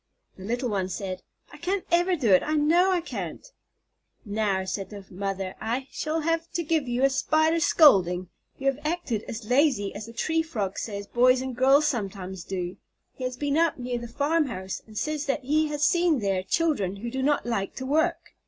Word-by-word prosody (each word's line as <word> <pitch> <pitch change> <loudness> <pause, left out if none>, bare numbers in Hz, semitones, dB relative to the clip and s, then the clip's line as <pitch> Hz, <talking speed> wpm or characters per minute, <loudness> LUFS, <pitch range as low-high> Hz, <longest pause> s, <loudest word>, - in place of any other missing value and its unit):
The 190 - -11
little 245 +3 -1
one 190 -3 -1
said, 185 0 -4 0.3
"I - - -10
can't 375 +2 -2
ever 350 +2 +3
do 245 - +1
it, 185 - +7
I 310 - -1
know 330 +5 +4
I 365 -2 +2
can't." 330 - -6 0.8
"Now," 205 -3 0
said 190 0 -4
the 200 -2 -9
mother, 195 0 -3
"I 245 +5 -2
shall 315 +1 -2
have 330 +1 -1
to 345 -1 -1
give 315 -3 0
you 245 +2 0
a 275 - +6
Spider 315 +4 +2
scolding. 185 - +5 0.3
You 270 - -8
have 275 0 +2
acted 305 -9 -1
as 225 -1 -6
lazy 250 -6 +2
as 210 +2 -7
the 230 - -10
Tree 320 +7 0
Frog 215 -12 -3
says 200 -2 -5
boys 250 +4 +4
and 260 -1 -4
girls 270 +4 +5
sometimes 195 - -3
do. 180 -1 -4 0.4
He 255 - -6
has 255 0 -3
been 290 +2 0
up 335 -1 +2
near 245 -1 -3
the 235 - -7
farm 295 +6 +1
house, 190 -6 -5
and 215 -1 -11
says 305 +2 -2
that 275 - -1
he 305 +4 +2
has 300 0 0
seen 345 -3 +3
there 195 -5 0
children 205 - 0
who 235 +4 -6
do 265 +1 -2
not 290 +2 +1
like 225 -5 -2
to 260 - -5
work. 315 +5 0
255 Hz, 205 wpm, -26 LUFS, 200-310 Hz, 0.8 s, it